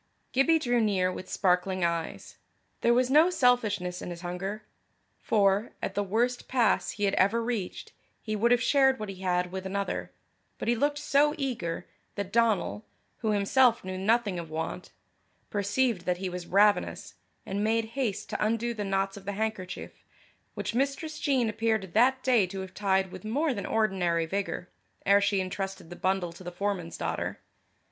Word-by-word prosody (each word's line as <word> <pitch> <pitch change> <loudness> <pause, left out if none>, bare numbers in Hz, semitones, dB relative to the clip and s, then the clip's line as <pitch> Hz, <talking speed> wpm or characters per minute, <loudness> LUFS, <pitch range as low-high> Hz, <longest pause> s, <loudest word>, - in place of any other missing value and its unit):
Gibbie 295 +5 +4
drew 245 -6 +1
near 190 -4 +2
with 185 0 -8
sparkling 185 -1 +1
eyes. 170 -1 -3 0.4
There 235 - +3
was 250 +1 +3
no 310 +5 +6
selfishness 215 - +1
in - - -5
his 170 -1 -7
hunger, 190 +4 -4 0.6
for, 205 -2 +2
at - - -3
the 205 - 0
worst 235 +5 0
pass 245 -4 +2
he 205 - -5
had 200 - +2
ever 200 +5 +3
reached, 230 -5 -4 0.3
he 215 -1 -3
would 225 +3 +2
have 245 -1 +3
shared 265 -2 +4
what 215 -1 -5
he 195 - -7
had 180 -1 0
with 190 0 -4
another, 200 +1 -3 0.5
but - - -5
he 240 - +3
looked 290 +4 +1
so 295 +1 +3
eager, 230 - -3 0.3
that 200 -1 -4
Donal, 225 -2 +2 0.3
who 220 - -2
himself 230 +4 +3
knew 185 0 -5
nothing 205 -1 +1
of 165 -2 -7
want, 160 +3 -4 0.6
perceived 205 -1 0
that 180 -1 +1
he 185 0 -3
was 180 -1 -6
ravenous, 205 +2 +2 0.3
and 200 +2 -2
made 225 +1 +2
haste 215 -7 -2
to - - -1
undo 230 +2 0
the 210 -2 -4
knots 195 0 -1
of 195 - -11
the 200 - -3
handkerchief, 210 -3 -4 0.5
which - - -3
Mistress 275 +5 -1
Jean 265 -5 +2
appeared 220 -4 -1
that 260 +4 +4
day 240 -7 +4
to 190 +1 -5
have 190 0 -8
tied 190 -2 +1
with - - -9
more 275 +7 0
than 200 - -4
ordinary 185 -6 +1
vigour, 190 0 -3 0.4
ere 200 +1 +5
she 200 -1 +2
intrusted 190 -2 -4
the - - -6
bundle 185 -2 -1
to 180 - -12
the 175 - -6
foreman's 185 -2 -3
daughter. - - -3
205 Hz, 175 wpm, -28 LUFS, 185-235 Hz, 0.6 s, no